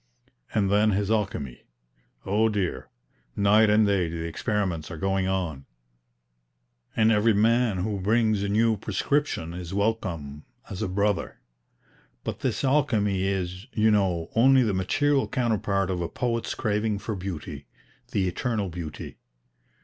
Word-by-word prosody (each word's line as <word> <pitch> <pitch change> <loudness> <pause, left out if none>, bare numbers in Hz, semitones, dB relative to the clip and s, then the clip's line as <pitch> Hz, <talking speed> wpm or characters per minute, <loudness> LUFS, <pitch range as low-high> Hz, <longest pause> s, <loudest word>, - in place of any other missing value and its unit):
And 100 -3 +2
then 105 +1 +3
his 100 +2 0
alchemy! 90 - -2 0.6
Oh 105 +3 +2
dear, 100 -4 -2 0.5
night 105 +2 +4
and 105 +1 +5
day 95 -4 +1
the 80 0 -4
experiments 90 -2 -2
are 80 - -7
going 95 +1 0
on, 85 -8 -2 1.3
and 110 0 +4
every 110 0 +3
man 115 0 +3
who 100 +2 -2
brings 110 +1 +2
a 100 - -1
new 110 +1 +2
prescription 105 - -1
is 90 +1 -6
welcome 90 -9 -2 0.3
as 95 - -5
a - - 0
brother. 100 0 -1 0.8
But - - -4
this - - -2
alchemy 110 -9 +2
is, 95 +1 -3
you 110 0 +3
know, 90 -5 +1
only 130 +3 +6
the 110 -4 0
material 135 +10 +1
counterpart 100 -5 0
of 90 -1 -2
a 85 - -2
poet's 115 -2 -2
craving 105 -1 0
for 110 +1 -4
Beauty, 95 -4 -6 0.4
the 95 -2 0
eternal 105 +1 -2
Beauty. 80 -4 -7
100 Hz, 140 wpm, -26 LUFS, 90-110 Hz, 1.3 s, only